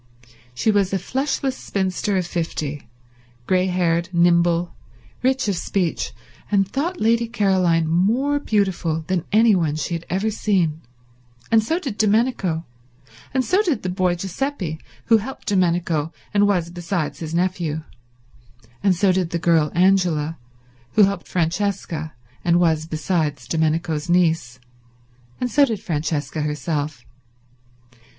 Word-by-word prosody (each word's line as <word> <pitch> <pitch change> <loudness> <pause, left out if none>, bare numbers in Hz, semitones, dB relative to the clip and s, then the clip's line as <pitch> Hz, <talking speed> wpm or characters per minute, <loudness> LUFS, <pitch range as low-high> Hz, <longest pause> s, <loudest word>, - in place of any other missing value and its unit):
She 220 - +2
was 200 -2 +2
a 195 - +1
fleshless 265 +3 -1
spinster 195 -1 -1
of 180 - 0
fifty, 155 -6 -4 0.6
grey 185 +3 +2
haired, 175 -1 +1
nimble, 170 0 +3 0.5
rich 265 -1 +1
of 200 - +1
speech, 175 -1 -1 0.4
and 195 -2 +2
thought 310 - -2
Lady 230 +1 +2
Caroline 185 -7 +2
more 230 - +2
beautiful 190 - 0
than 185 -2 -1
anyone 200 -8 +4
she 155 +2 -3
had 170 0 -5
ever 195 +4 0
seen; 175 -7 0 0.7
and 225 -1 +5
so 320 +9 0
did 265 - -5
Domenico; 210 -6 +1 0.7
and 260 -1 0
so 375 +4 +3
did 330 - -1
the 185 - -2
boy 180 -1 +1
Giuseppe 185 - -3 0.3
who 225 - +5
helped 235 +6 -7
Domenico 170 -5 +1 0.2
and 205 0 +4
was, 175 -4 0
besides, 175 -2 -3
his 160 0 -4
nephew; 170 -4 -1 1.0
and 195 -2 +3
so 190 +2 +3
did 180 -2 0
the 170 - -1
girl 160 -2 +2
Angela 175 -4 +2 0.5
who 215 - +6
helped 195 -2 0
Francesca 170 -2 -2 0.3
and 175 0 +3
was, 160 -2 +2
besides, 155 -2 -1
Domenico's 160 0 0
niece; 165 -8 +2 0.8
and 250 -1 -2
so 285 +6 +5
did 225 -7 +1
Francesca 155 -5 -2
herself. 150 -2 -3
180 Hz, 130 wpm, -22 LUFS, 165-205 Hz, 1.0 s, who